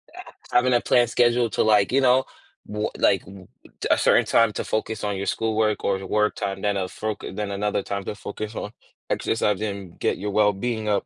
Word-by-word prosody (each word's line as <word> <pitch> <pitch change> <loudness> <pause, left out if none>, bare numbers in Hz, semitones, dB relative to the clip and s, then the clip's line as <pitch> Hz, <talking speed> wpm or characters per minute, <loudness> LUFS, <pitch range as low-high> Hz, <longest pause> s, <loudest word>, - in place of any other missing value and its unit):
Ha - - -9 0.3
having 125 +1 +3
a 120 - +3
planned 120 -2 +3
schedule 120 -1 +3
to, - - +1
like, 105 -2 +3
you 135 +2 +3
know, 130 0 +4 0.5
b 105 0 -1
like, - - +3
w 95 -1 -13 0.3
t - - -1
a - - +5
certain - - +4
time 115 -2 +3
to - - -3
focus 110 0 -3
on 100 -1 -1
your 100 - -3
schoolwork 110 -1 0
or 100 - +1
your 95 - -8
work 105 0 +1
time, 95 -1 -4
then 100 -1 0
a 95 - -1
foc 110 +3 -4 0.2
then 105 -1 -3
another 100 0 -1
time 100 0 -4
to - - -4
focus 105 +2 -6
on 105 - -5 0.4
exercising 105 -1 0
and 95 -4 -12
get - - 0
your 105 +2 -4
well-being 105 +2 +1
up. 105 - +1
105 Hz, 215 wpm, -24 LUFS, 100-115 Hz, 0.5 s, a